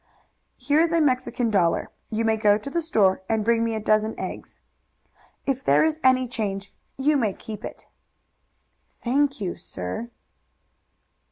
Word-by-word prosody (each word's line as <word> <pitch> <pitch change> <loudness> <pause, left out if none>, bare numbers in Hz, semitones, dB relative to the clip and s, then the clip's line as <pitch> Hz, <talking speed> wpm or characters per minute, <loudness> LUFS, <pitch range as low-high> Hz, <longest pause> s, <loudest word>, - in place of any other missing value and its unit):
"Here 295 +1 +2
is 335 0 +3
a 335 - +3
Mexican 255 -5 +1
dollar. 175 -5 +1 0.2
You 225 +1 -1
may 220 0 +3
go 210 -1 +4
to 250 +6 -8
the 340 - 0
store 205 - +2
and 220 -2 +1
bring 230 0 +3
me 230 -1 -1
a - - -1
dozen 215 +1 +1
eggs. - - -7 0.9
If 270 -1 -1
there - - +4
is 315 0 0
any 255 -1 +4
change 200 -4 -4 0.2
you 290 +2 +3
may 220 -7 +1
keep 215 +1 -9
it." - - -8 1.2
"Thank 275 +3 +1
you, 185 -4 -3
sir." 90 - -6
230 Hz, 155 wpm, -24 LUFS, 215-275 Hz, 1.2 s, go